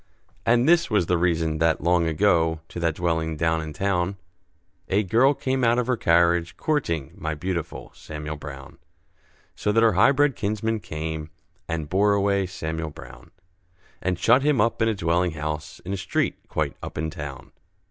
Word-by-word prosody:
And 120 +3 +4
this 170 0 +4
was 105 -6 +2
the 90 0 +1
reason 80 -3 +1
that, 80 0 +2
long 85 0 +3
ago, 80 -1 +2
To - - -6
that 85 -2 0
dwelling 80 -2 -1
down 80 0 +1
in 80 -1 -6
town, 95 +1 -1 0.7
A 100 +3 +2
girl 125 +9 +3
came 130 -1 -1
out 120 0 +4
of 125 - +1
her 125 +1 +1
carriage, 85 -3 +2
courting 85 - -1
My 80 0 -3
beautiful 85 +1 -4
Samuel 75 0 -7
Brown; 70 -2 -10 0.8
So 105 - 0
that 115 +2 +3
her 115 -2 +5
high 105 +9 +5
bred 140 -1 +2
kinsmen 110 +2 -1
came, 80 -3 -5 0.4
And 80 -2 -3
bore 100 +5 +3
away 100 -1 +1
Samuel 80 -3 -4
Brown, - - -13 0.7
And 90 -2 -1
shut 120 +8 +4
him 145 -2 +2
up 115 +2 +1
in 115 - +3
a 110 - +1
dwelling 85 -1 +1
house, 75 0 -5
In 95 - -3
a - - -2
street - - -2
quite - - -1
up - - -7
in 80 +1 -2
town. 70 -5 -8
85 Hz, 180 wpm, -24 LUFS, 80-105 Hz, 0.8 s, her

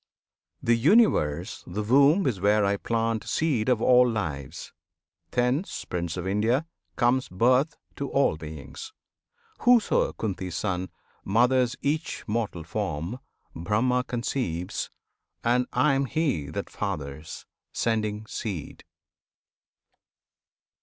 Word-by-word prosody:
This 115 0 +3
Universe 150 - +3
the 105 +4 -3
womb 140 - +5
is 115 -9 -1
where 105 +1 +4
I 100 +1 +1
plant 115 0 -1
Seed 135 -8 +1
of 120 -3 +2
all 125 0 +6
lives! 80 - -4 0.6
Thence, 125 +8 -1
Prince 85 -1 -3
of 90 - -4
India, 110 +9 +1 0.3
comes 125 +2 +2
Birth 125 - +2 0.2
to 140 - -3
all 135 - +2
beings! 80 - -9 0.7
Whoso, 245 -2 +4
Kunti's 95 -5 -4
Son! 95 -3 -2 0.3
Mothers 125 +4 +3
each 155 +3 -1
mortal 105 -6 -2
form, 85 - -3 0.4
Brahma 115 +9 +1
conceives, 115 -8 -3 0.5
And 125 +1 +2
I 150 -2 +3
am 135 0 +1
He 135 - -1
that 75 - -5
fathers, 70 +1 -5 0.3
sending 110 -1 -1
seed! 100 -7 -6
115 Hz, 110 wpm, -26 LUFS, 90-130 Hz, 0.7 s, all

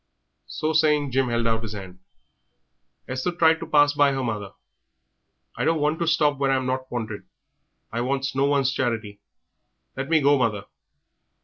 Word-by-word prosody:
So 155 +1 -2
saying, 150 -3 +2
Jim 130 +1 +1
held 115 0 0
out 115 -1 +1
his 110 -1 -6
hand. 95 -3 -9 1.1
Esther 130 +7 -2
tried 165 -1 +3
to 165 - -7
pass 145 -2 +4
by 145 -1 +3
her 135 -1 -2
mother. 105 -4 -4 1.0
"I - - -2
don't 165 0 +2
want 150 +2 0
to 170 - -1
stop 150 -4 +2
where 135 -1 +1
I'm 130 -1 +1
not 130 0 -3
wanted; 110 -3 -5 0.6
I 115 - -2
wants 135 +2 -1
no 135 +1 +2
one's 140 -2 +2
charity. 115 -6 -3 0.7
Let 135 +2 -4
me 160 -1 +4
go, 145 -1 +3
mother." 110 -5 -1
135 Hz, 170 wpm, -24 LUFS, 115-145 Hz, 1.1 s, pass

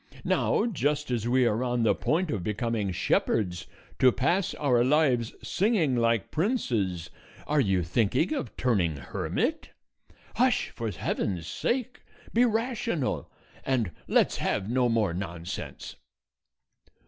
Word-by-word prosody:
now, - - +2
just 150 - -1
as 120 -2 -1
we 125 +1 +3
are 115 +1 +1
on 120 -2 0
the 110 - +4
point 165 +1 0
of 105 - -2
becoming 105 0 -1
shepherds, 90 0 0 0.3
to 130 - +6
pass 180 +10 0
our 125 -5 +2
lives 130 -4 +2
singing, 190 - +1
like 115 -3 +1
princes, 110 - -1 0.3
are 150 0 +1
you 95 -6 +1
thinking 115 - +1
of 275 - -4
turning 95 -11 +1
hermit? 70 -3 -2 0.7
Hush, - - +2
for 115 -1 -4
heaven's 90 -1 -2
sake; 250 - -2 0.3
be 240 +2 +5
rational, 230 - -1 0.3
and 120 -9 0 0.2
let's - - +3
have 95 - -1
no 125 +1 +2
more 110 -6 +1
nonsense." 85 -2 -6
120 Hz, 125 wpm, -28 LUFS, 100-150 Hz, 0.7 s, to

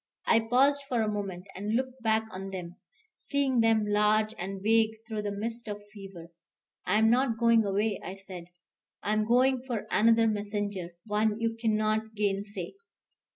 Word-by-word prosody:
I 230 - +5
paused 265 +5 +3
for 235 -3 +1
a - - -1
moment, 200 -3 -4
and 205 +4 -2
looked 260 +1 -2
back 220 -1 +2
on 190 +1 -6
them, 180 -2 -7 0.4
seeing 275 -3 0
them 225 -2 +3
large 210 +1 +2
and 195 +2 -4
vague 220 +2 +2
through 220 -2 -3
the 205 -1 -3
mist 230 +3 -4
of 205 -1 -4
fever. 190 -5 -11 0.6
"I 210 - +3
am 220 +1 +4
not 245 -2 +2
going 230 -1 +4
away," 205 +1 0
I 185 - -6
said. 190 -3 -9 0.6
"I 210 - 0
am 215 0 +1
going 255 +2 +3
for 245 -5 -4
another 230 +1 +4
messenger, 205 -4 -2
one 215 0 0
you 230 0 0
can't 220 -1 0
gainsay." 200 -2 -2
215 Hz, 165 wpm, -29 LUFS, 200-230 Hz, 0.6 s, I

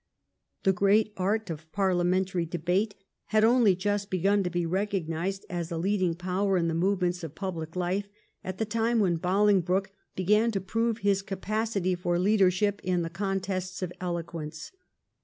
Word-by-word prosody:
The 190 - +4
great 205 +3 +3
art 200 +1 -1
of 160 0 -8
parliamen 185 -1 +2
tary 180 -3 -2
debate 180 +5 0 0.3
had 215 0 +2
only 230 -4 +5
just 205 +2 -1
begun 195 +3 +2
to 180 - -1
be 175 -1 -1
recognised 190 0 -2
as 175 -3 -4
a 165 - -2
leading 185 -1 +1
power 185 +2 0
in 170 -1 +1
the 165 - 0
movements 180 0 0
of 160 -2 -7
public 165 -4 -5
life 185 +3 -1 0.4
at 185 0 -5
the 220 - 0
time 230 +2 0
when 185 -6 +2
Bolingbroke 190 +1 +2 0.2
began 210 +5 +3
to 195 - 0
prove 225 +4 -1
his 200 -1 +3
capacity 195 0 -1
for 175 -1 0
leadership 200 +1 +2
in 180 -1 0
the 165 - -4
contests 190 -1 -3
of 180 -1 -4
eloquence. 165 -3 -5
190 Hz, 160 wpm, -28 LUFS, 175-205 Hz, 0.4 s, only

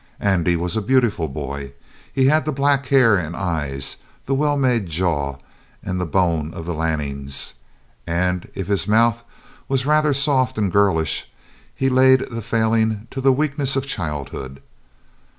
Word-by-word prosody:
Andy 90 -3 +2
was 85 +1 -2
a 110 - 0
beautiful 115 -7 +1
boy. 70 -1 -6 0.4
He 130 - +2
had 150 +1 +3
the 155 - 0
black 140 -1 +1
hair 125 -7 +5
and 85 -1 -4
eyes, 75 -8 -3 0.3
the 135 - -1
well 145 +1 +1
made 125 -7 +1
jaw, 75 -5 -1 0.5
and 90 -1 -3
the 90 - -2
bone 85 -3 0
of 80 - -6
the 85 - -3
Lannings, 70 -4 -2 0.5
and 90 +1 -1
if 95 - -3
his 100 -1 0
mouth 115 +2 +3 0.4
was 135 -1 0
rather 150 0 +3
soft 130 -3 +1
and 100 -4 0
girlish 95 -6 +1 0.5
he 135 - 0
laid 130 0 +5
the 115 0 -4
failing 110 -1 0
to 135 - -4
the 135 +1 +5
weakness 140 -1 0
of 135 0 -1
childhood. 75 - -5
100 Hz, 155 wpm, -21 LUFS, 80-130 Hz, 0.5 s, hair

